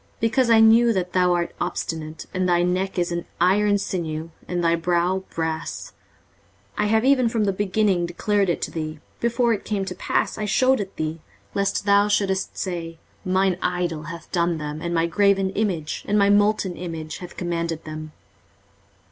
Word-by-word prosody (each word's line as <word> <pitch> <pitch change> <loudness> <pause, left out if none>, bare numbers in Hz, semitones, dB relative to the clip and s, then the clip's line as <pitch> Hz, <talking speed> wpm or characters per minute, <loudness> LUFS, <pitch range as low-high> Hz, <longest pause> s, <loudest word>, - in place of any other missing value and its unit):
23:048:004 - - -35
Because 240 +2 +2
I 225 -1 +6
knew 225 +1 +6
that 180 -2 -2
thou 180 -1 +3
art 170 -1 -2
obstinate, 160 -1 -4
and 185 -1 0
thy 175 0 +3
neck 185 +2 -1
is 175 0 0
an 170 0 -3
iron 205 +4 +3
sinew, 165 -4 -4 0.2
and 175 -1 -2
thy 170 0 +3
brow 175 +2 +1
brass; 160 0 -4 0.8
23:048:005 - - +1
I - - +1
have 220 +2 +2
even 260 -3 +4
from 225 -2 0
the 200 -1 +1
beginning 195 -2 +1
declared 200 +3 0
it 175 - -1
to - - -3
thee; 155 -1 -5 0.2
before 235 0 +2
it 205 - -4
came 200 -3 -2
to 190 - -4
pass - - -1
I 210 - -1
shewed 260 +5 +3
it 195 -2 -5
thee: 155 +1 -3 0.3
lest 200 0 0
thou 200 0 +5
shouldest 195 -2 0
say, 170 -3 -4 0.3
Mine 185 0 +1
idol 175 -3 -1
hath 165 +1 -9
done 170 -1 +1
them, 150 0 -5
and 170 - -3
my 165 0 +2
graven 195 +2 +2
image, 185 -8 -2
and 210 - +2
my 200 0 +4
molten 205 -2 +2
image, 165 -3 -6
hath 180 - -10
commanded 170 -2 -2
them. 155 0 -7
180 Hz, 185 wpm, -23 LUFS, 170-205 Hz, 0.8 s, I